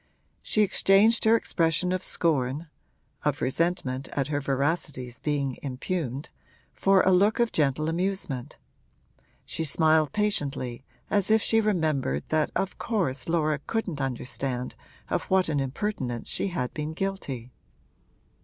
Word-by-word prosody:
She 215 - +2
exchanged 205 +3 +4
her 220 +1 +6
expression 170 -4 +1
of 185 0 -1
scorn 150 -1 0 0.5
(of 145 -1 0
resentment 135 -3 -1
at 140 0 -1
her 145 -1 -1
veracity's 140 -2 -1
being 140 -3 -1
impugned) 140 0 -3 0.4
for 195 -1 +4
a 190 - +4
look 200 +5 +4
of 235 -1 +2
gentle 150 0 +1
amusement; 170 -7 -2 0.9
she 165 - -3
smiled 155 -1 +3
patiently, 145 - -1 0.3
as 205 -1 +2
if 220 0 +4
she 225 0 +4
remembered 155 - 0
that 155 -1 +2
of 195 - -2
course 165 - -1
Laura 155 -3 +1
couldn't 190 -10 -2
understand 125 -1 -3 0.3
of - - -1
what 185 -2 +2
an 145 -2 +1
impertinence 135 - -3
she - - 0
had 170 -10 -3
been 150 +1 -4
guilty. 150 -10 -4
155 Hz, 130 wpm, -27 LUFS, 135-190 Hz, 0.9 s, her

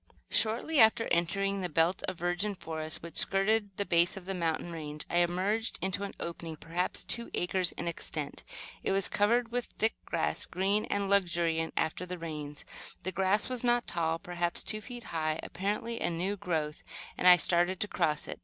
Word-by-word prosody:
Shortly 235 +8 +2
after 225 0 +6
entering 195 +4 +1
the 180 - -1
belt 165 +3 +2
of 185 - -3
virgin 175 +4 -1
forest 160 -3 -5
which 170 - -8
skirted 200 0 +2
the 200 - 0
base 175 +1 +3
of 185 - -8
the 195 - -2
mountain 170 -1 -1
range, 150 -2 -5
I 175 - +2
emerged 185 +6 +1
into 190 +1 -1
an 200 - -8
opening, 170 -1 -5
perhaps 170 +4 -2
two 235 0 -2
acres 180 0 0
in - - -4
extent. 170 - -4 0.4
It - - 0
was 195 0 +4
covered 230 +3 +2
with 245 0 -1
thick 220 +1 0
grass, - - 0
green 195 +3 +1
and 200 -1 -1
luxuriant 170 -4 +2
after 180 +3 -1
the 180 0 -4
rains. 150 -3 -6 0.4
The 185 - -2
grass 190 +3 +2
was 255 -1 -2
not 240 0 +3
tall, 165 -1 0
perhaps 175 0 -2
two 215 - +1
feet 245 +1 -8
high, 155 -1 -1
apparently 210 +5 -3
a - - +2
new 180 +4 -1
growth, 160 -5 -2 0.3
and 180 - +1
I 180 - +11
started 175 +2 +2
to 210 - +1
cross 155 -6 0
it. - - -6
180 Hz, 185 wpm, -31 LUFS, 170-205 Hz, 0.4 s, I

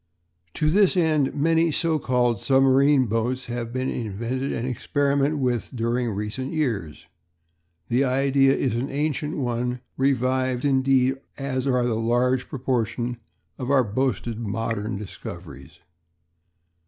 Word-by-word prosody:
To 150 0 +1
this 195 0 +4
end 155 -5 +2
many 165 +3 +3
so 160 +1 +1
called 120 -5 +1
submarine 135 +1 +4
boats 120 +4 -1
have 120 -1 -4
been 130 +1 -2
invented 120 +5 -3
and 120 - -3
experimented 140 +3 0
with 125 -3 -1
during 120 +1 0
recent 105 +7 -4
years. 100 - -2 0.8
The 125 +3 +2
idea 135 +1 +3
is 130 - 0
an 120 +4 -2
ancient 150 +2 -2
one 125 -1 -2 0.2
revived, 130 -1 +1
as - - +3
indeed 135 0 +3 0.2
are 135 -1 -2 0.3
the 120 - 0
large 120 +3 +1
proportion 120 -2 -2 0.4
of 125 -1 -4
our 140 -2 +4
boasted 115 0 -2
modern 110 -1 -3
discoveries. 70 -9 -9
130 Hz, 125 wpm, -24 LUFS, 115-140 Hz, 0.8 s, this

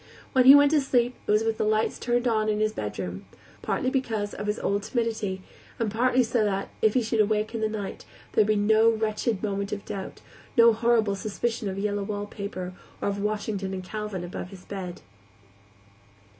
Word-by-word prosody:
When 255 -1 +5
he 270 +2 +11
went 285 0 +6
to 305 -2 +4
sleep 245 -2 +1
it - - +2
was 210 +1 +4
with 225 -1 -1
the - - +2
lights 215 +1 +1
turned 240 +1 0
on 215 -2 +1
in 210 0 0
his 215 0 +1
bedroom; 95 - -5 0.4
partly 255 - -1
because 225 -6 -1
of 205 - -5
his 210 - 0
old 200 +1 0
timidity, 220 -4 -2 0.3
and 225 -3 -1
partly 250 +3 +3
so 230 -1 +1
that, 195 -2 -1
if 220 -1 +3
he 250 - +3
should 220 -1 +2
wake 215 +1 0
in 225 - -3
the 220 - +1
night, 205 -3 -5 0.3
there - - +4
would 210 - +3
be 215 - +3
no 220 +2 +4
wretched 220 -1 -1
moment 200 -1 -2
of 205 - -4
doubt, 195 -1 -6 0.4
no 230 -1 +7
horrible 225 -2 +2
suspicion 215 +1 -2
of 190 - -5
yellow 205 0 -1
wallpaper, 200 -2 -5 0.3
or - - -1
of 200 0 -3
Washington 205 -2 -2
and 185 - -5
Calvin 210 -1 -5
above 175 0 -6
his 185 -2 -13
bed. 185 -3 -6
215 Hz, 200 wpm, -26 LUFS, 200-230 Hz, 0.4 s, he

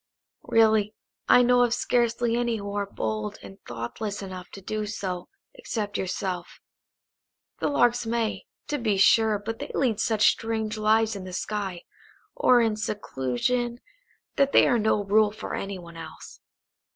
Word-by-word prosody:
"Really, 220 -2 +3 0.3
I 250 - +7
know 245 0 +4
of 240 -1 +3
scarcely 240 -1 +1
any 240 -1 0
who 200 -1 -6
are 205 -1 -1
bold 110 - -3
and 95 -1 -12
thoughtless 200 - -5
enough 185 -1 -8
to - - -8
do 215 +2 -3
so 185 -4 -4 0.2
except 220 - -4
yourself. 185 -2 -3 1.0
The - - 0
Larks 245 -4 +2
may, 230 -1 -2 0.2
to 295 - -2
be 215 -4 +1
sure, 220 +2 +5
but 220 +3 -6
they 285 - -6
lead 235 -6 +1
such 220 -2 +4
strange 220 -1 -3
lives 220 0 +2
in 195 - -6
the 185 -1 -8
sky, 195 -2 -3 0.5
or 255 - +4
in 220 -2 +1
seclusion, 215 - -2 0.6
that 275 -1 +3
they - - +6
are 240 -3 +3
no 215 -1 +2
rule 210 +2 +4
for 215 - -7
any 195 0 -4
one 170 -2 -11
else. 165 - -10
215 Hz, 155 wpm, -26 LUFS, 195-235 Hz, 1.0 s, I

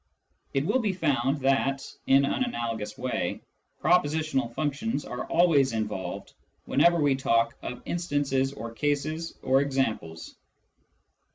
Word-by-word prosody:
It 135 +1 +1
will 260 - +2
be 210 -5 0
found 140 -5 0
that, 135 0 +1 0.2
in 135 +1 +5
an 200 - 0
analogous 115 - -3
way, 130 0 -2 0.4
propositional 155 -6 +2
functions 150 +3 -2
are 125 - -5
always 155 -7 +3
involved 105 -4 -4 0.3
whenever 170 +4 +4
we 145 -2 +3
talk 115 -3 +1
of 125 - -6
instances 145 -6 0
or 115 -3 -7
cases 150 +5 -2
or 135 +1 +4
examples. 110 -13 -2
135 Hz, 120 wpm, -27 LUFS, 125-155 Hz, 0.4 s, in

